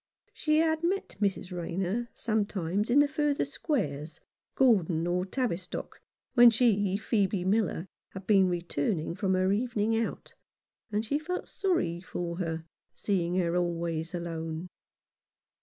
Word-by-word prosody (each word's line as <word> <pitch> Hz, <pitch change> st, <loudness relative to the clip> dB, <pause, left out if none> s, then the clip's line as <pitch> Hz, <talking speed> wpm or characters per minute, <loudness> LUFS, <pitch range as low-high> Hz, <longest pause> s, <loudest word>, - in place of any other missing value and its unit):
She 305 Hz, 0 st, +1 dB
had 320 Hz, 0 st, +2 dB
met 380 Hz, +3 st, -1 dB
Mrs. 190 Hz, -2 st, -1 dB
Rayner 185 Hz, +7 st, -2 dB
sometimes 205 Hz, -2 st, -1 dB
in 245 Hz, -, +4 dB
the 290 Hz, 0 st, +6 dB
further 295 Hz, -1 st, 0 dB
squares 165 Hz, -, -3 dB, 0.2 s
— -, -, -59 dB
Gordon 180 Hz, -10 st, +3 dB
or 180 Hz, +2 st, 0 dB
Tavistock— 190 Hz, -7 st, -3 dB, 0.3 s
when 240 Hz, -1 st, +9 dB
she, 205 Hz, -5 st, +2 dB
Phcebe 200 Hz, -3 st, 0 dB
Miller, 195 Hz, -4 st, +1 dB, 0.3 s
had 190 Hz, 0 st, -8 dB
been 195 Hz, -3 st, +5 dB
returning 170 Hz, -1 st, -1 dB
from 190 Hz, +1 st, 0 dB
her 185 Hz, +1 st, +2 dB
evening 225 Hz, 0 st, +1 dB
out, 225 Hz, 0 st, -3 dB, 0.6 s
and 210 Hz, +1 st, 0 dB
she 285 Hz, +6 st, 0 dB
felt 360 Hz, +4 st, -4 dB
sorry 335 Hz, -, 0 dB
for 175 Hz, -2 st, -4 dB
her, 165 Hz, -2 st, -3 dB, 0.3 s
seeing 180 Hz, -4 st, 0 dB
her 175 Hz, -2 st, +1 dB
always 170 Hz, -1 st, -1 dB
alone. 165 Hz, 0 st, -4 dB
190 Hz, 135 wpm, -29 LUFS, 170-235 Hz, 0.6 s, when